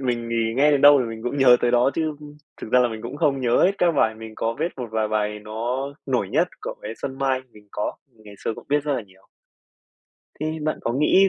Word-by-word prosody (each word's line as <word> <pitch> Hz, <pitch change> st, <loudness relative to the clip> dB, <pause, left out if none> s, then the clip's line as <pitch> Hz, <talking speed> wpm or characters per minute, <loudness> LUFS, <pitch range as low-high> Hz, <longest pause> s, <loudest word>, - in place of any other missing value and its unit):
mình 120 Hz, -3 st, -2 dB
thì 115 Hz, -1 st, 0 dB
nghe 150 Hz, +2 st, +5 dB
đến 145 Hz, -, +3 dB
đâu 145 Hz, 0 st, +8 dB
thì -, -, 0 dB
mình 115 Hz, -1 st, -7 dB
cũng 125 Hz, +4 st, -3 dB
nhớ 125 Hz, -2 st, +7 dB
tới 120 Hz, -, +2 dB
đó 120 Hz, +2 st, +4 dB
chứ 155 Hz, -2 st, -1 dB, 0.4 s
thực 110 Hz, -, -8 dB
ra 125 Hz, -, +6 dB
là 125 Hz, -, +3 dB
mình 110 Hz, -1 st, -7 dB
cũng 120 Hz, +4 st, -6 dB
không 145 Hz, -3 st, +1 dB
nhớ 120 Hz, -2 st, +3 dB
hết 190 Hz, -, +4 dB
các 175 Hz, -, +4 dB
bài, 110 Hz, -6 st, +2 dB
mình 110 Hz, 0 st, -10 dB
có 115 Hz, +1 st, -2 dB
biết 170 Hz, -, -1 dB
một 125 Hz, -3 st, -5 dB
vài 110 Hz, -1 st, 0 dB
bài 105 Hz, 0 st, -1 dB
nó 115 Hz, +5 st, -3 dB, 0.2 s
nổi 125 Hz, -8 st, 0 dB
nhất -, -, +2 dB
của -, -, -5 dB
bé 105 Hz, -, -5 dB
Xuân 135 Hz, -1 st, -4 dB
Mai 135 Hz, -1 st, +1 dB
mình 105 Hz, -1 st, -18 dB
có, 105 Hz, -, -2 dB, 0.2 s
mình 110 Hz, -2 st, -23 dB
ngày 105 Hz, -, -12 dB
xưa 115 Hz, -, -1 dB
cũng -, -, -11 dB
biết 145 Hz, 0 st, +1 dB
rất 150 Hz, -, 0 dB
là 125 Hz, -, -2 dB
nhiều. 95 Hz, -2 st, -23 dB, 1.1 s
Thì 155 Hz, +1 st, -2 dB
bạn 155 Hz, +1 st, -1 dB
có 115 Hz, -, -1 dB
nghĩ 185 Hz, +8 st, +4 dB
125 Hz, 260 wpm, -23 LUFS, 110-140 Hz, 1.1 s, đâu